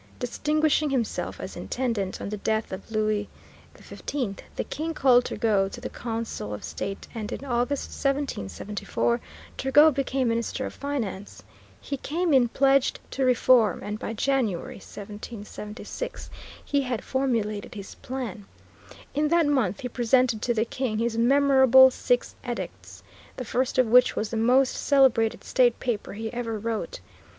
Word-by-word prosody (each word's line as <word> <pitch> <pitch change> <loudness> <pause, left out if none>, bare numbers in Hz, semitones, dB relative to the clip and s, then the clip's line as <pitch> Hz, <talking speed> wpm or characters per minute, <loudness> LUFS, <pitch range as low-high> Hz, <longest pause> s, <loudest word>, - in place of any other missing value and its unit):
Distinguishing 300 +4 +1
himself 255 -5 -2
as - - -7
Intendant, 230 -7 -2
on - - -5
the 210 - -4
death 220 +2 -1
of 190 +3 -7
Louis 215 -1 0 0.5
XV 240 -9 -4 0.2
the - - -1
King 320 +2 -4
called 250 -3 +5
Turgot 200 -4 +1
to - - -6
the - - -6
Council 225 - -4
of - - -10
State, 195 0 -5
and 220 -3 -5
in 280 - -5
August, 250 +2 -1
1774, 235 - -2 0.4
Turgot 295 +3 +6
became 265 -2 0
Minister 235 +3 -1
of - - -6
Finance. 230 -9 -5 0.4
He 280 - -4
came 330 +4 -1
in 255 -3 +5
pledged 275 +2 +2
to 270 - -1
reform, 250 -2 +4
and 210 +1 -4
by 225 - -4
January, 230 -6 -1
1776, 210 - -8 0.3
he 285 -1 +1
had 250 -4 -3
formulated 225 -7 -1
his 200 -2 -8
plan. 240 -6 -6 0.7
In 300 +1 +1
that 335 +1 +3
month 260 -8 +1
he 250 - -3
presented 245 -1 +2
to 240 -1 0
the 220 +1 +1
King 235 -2 -2
his 230 0 0
memorable 265 +1 +6
Six - - 0
Edicts, - - -6 0.3
the 255 - -4
first 255 +3 -1
of 255 - +5
which 250 +2 +5
was 215 - -2
the 225 - -2
most 250 +4 +4
celebrated 260 -6 +3
state 245 -3 +2
paper 240 -5 -3
he 220 +3 -5
ever 230 -2 -3
wrote. 230 - -4
245 Hz, 150 wpm, -26 LUFS, 215-270 Hz, 0.7 s, Turgot